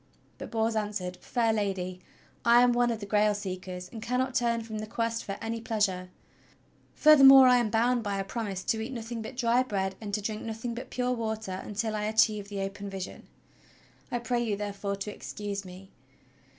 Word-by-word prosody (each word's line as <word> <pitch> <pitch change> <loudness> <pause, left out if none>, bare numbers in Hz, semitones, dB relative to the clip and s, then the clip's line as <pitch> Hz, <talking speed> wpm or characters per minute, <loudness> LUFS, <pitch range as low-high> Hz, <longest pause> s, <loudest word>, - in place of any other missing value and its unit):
But - - -7
Bors 225 0 0
answered: 205 -4 -3
"Fair 230 -3 0
Lady, 190 -3 -2 0.4
I 235 +1 +6
am 245 0 +4
one 240 0 +3
of 230 -2 -2
the - - -4
Grail 210 0 +2
seekers, 185 -2 -6
and 225 - -7
cannot 250 +3 -1
turn 235 -1 +1
from 220 -1 -6
the 215 - -5
Quest 230 +1 -2
for 195 0 -5
any 225 0 -4
pleasure. 200 -5 -1 0.9
Furthermore 270 -3 +9
I 250 0 +6
am 240 -3 +1
bound 235 +2 +2
by 205 -2 -2
a 195 - -1
promise 195 -2 -4
to 220 - 0
eat 225 +4 -5
nothing 230 -1 -5
but 220 +2 -8
dry 240 0 +3
bread 195 -6 -1
and 210 -2 -5
to - - -1
drink 215 +1 -4
nothing 225 +1 -4
but 235 - -7
pure 250 0 -1
water 220 -5 -3
until 215 +1 -3
I 210 0 -2
achieve 215 -2 +2
the 200 -1 -4
open 200 +1 -5
vision. 190 -1 -7 0.8
I 245 - 0
pray 240 0 -1
you, 215 -3 -1
therefore, 200 -1 -3
to 200 +1 -5
excuse 205 -1 -5
me." 185 +1 -12
220 Hz, 195 wpm, -29 LUFS, 200-235 Hz, 0.9 s, Furthermore